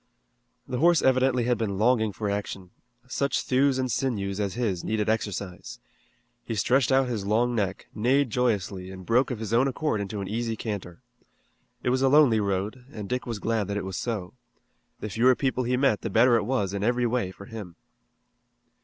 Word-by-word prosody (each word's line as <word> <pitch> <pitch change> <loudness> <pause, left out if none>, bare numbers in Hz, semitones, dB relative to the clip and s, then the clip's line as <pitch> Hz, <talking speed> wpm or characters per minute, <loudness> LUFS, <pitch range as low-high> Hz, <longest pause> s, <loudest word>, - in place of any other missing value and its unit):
The 125 - -3
horse 170 +1 +4
evidently 130 -1 +3
had 120 0 +1
been 100 -4 -2
longing 110 0 +2
for 105 +1 -4
action. 100 -2 -4 0.4
Such 140 +2 0
thews 135 +1 +2
and 130 -1 -1
sinews 105 -6 -1
as 100 -1 -2
his 105 -8 -1
needed 105 -1 -1
exercise. 100 -4 -3 0.7
He 115 - -4
stretched 125 +4 +2
out 135 0 +4
his 115 -5 -3
long 120 +4 +2
neck, 100 -5 -2
neighed 125 +4 +2
joyously, 100 -6 -1
and 95 -1 -9
broke 120 +6 +3
of 125 - -3
his 110 0 -5
own 125 +4 +4
accord 135 -5 -1
into 100 +1 -4
an 100 - -4
easy 115 +2 -2
canter. 100 -6 -6 0.8
It 125 - +1
was 130 +1 +1
a 135 - +4
lonely 140 -6 +5
road, 100 +5 -2
and 105 -5 -7
Dick 125 +2 -3
was 115 -2 -3
glad 110 -1 -1
that 100 0 -2
it 100 - -3
was 95 -1 -5
so. 105 -7 -3 0.7
The 105 - -4
fewer 125 +5 +4
people 130 -2 -1
he 125 +1 +1
met 130 -6 +2
the 115 - -3
better 120 +4 +5
it 110 -3 +1
was 105 -6 -1
in 100 0 -2
every 120 +2 +1
way 120 -5 0
for 95 +1 -11
him. 100 -6 -8
115 Hz, 195 wpm, -26 LUFS, 100-125 Hz, 0.8 s, lonely